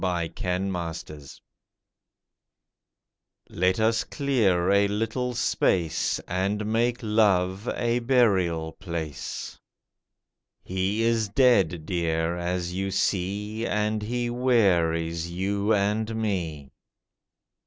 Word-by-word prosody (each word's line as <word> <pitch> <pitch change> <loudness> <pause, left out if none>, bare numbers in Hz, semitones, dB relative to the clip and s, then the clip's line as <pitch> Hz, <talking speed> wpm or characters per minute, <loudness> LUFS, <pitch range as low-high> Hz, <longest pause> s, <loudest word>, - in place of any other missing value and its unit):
LOVE'S 85 -3 -1
BURIAL 85 -6 -3 2.2
Let 90 +3 +1
us 110 0 +2
clear 100 -11 +1
a 100 0 +4
little 115 +4 -2
space, 85 -7 +1
And 100 +4 -1
make 115 +3 +1
Love 100 -2 +2
a 120 0 0
burial 95 -10 +2
place. 80 -6 -6 1.0
He 95 +4 -1
is 115 -2 +1
dead, 100 - +3
dear, 85 -1 -1
as 90 0 -2
you 95 +1 -2
see, 105 +4 -1
And 105 +1 0
he 120 +2 -2
wearies 85 -9 +1
you 100 +4 -1
and 105 +2 +1
me. 85 -10 -3
100 Hz, 90 wpm, -26 LUFS, 85-110 Hz, 2.2 s, a